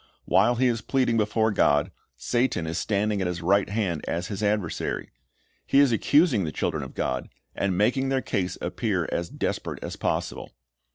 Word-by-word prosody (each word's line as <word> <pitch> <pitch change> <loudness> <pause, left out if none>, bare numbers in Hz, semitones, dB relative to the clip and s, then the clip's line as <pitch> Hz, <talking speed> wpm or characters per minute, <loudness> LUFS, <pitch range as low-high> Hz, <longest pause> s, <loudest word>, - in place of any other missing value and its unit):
While 120 - +4
he 130 +2 +2
is 115 -3 +1
pleading 125 0 +1
before 110 +1 +2
God, 75 -7 +2 0.3
Satan 120 -9 0
is 80 +1 -2
standing 105 -1 0
at 95 - 0
his 90 -1 -4
right 100 +3 +3
hand 100 -7 -1
as 85 +2 -2
his 100 -1 -4
adversary'. 105 -5 -1 0.6
He - - +2
is 140 -3 +5
accusing 140 - +3
the 80 - -3
children 75 +1 -2
of 65 - -8
God, 65 - -2 0.2
and 95 -2 -1
making 130 +6 +2
their 135 0 +2
case 90 -2 -2
appear - - -1
as 85 0 -2
desperate - - -3
as - - -6
possible. - - -3
105 Hz, 175 wpm, -26 LUFS, 90-120 Hz, 0.6 s, is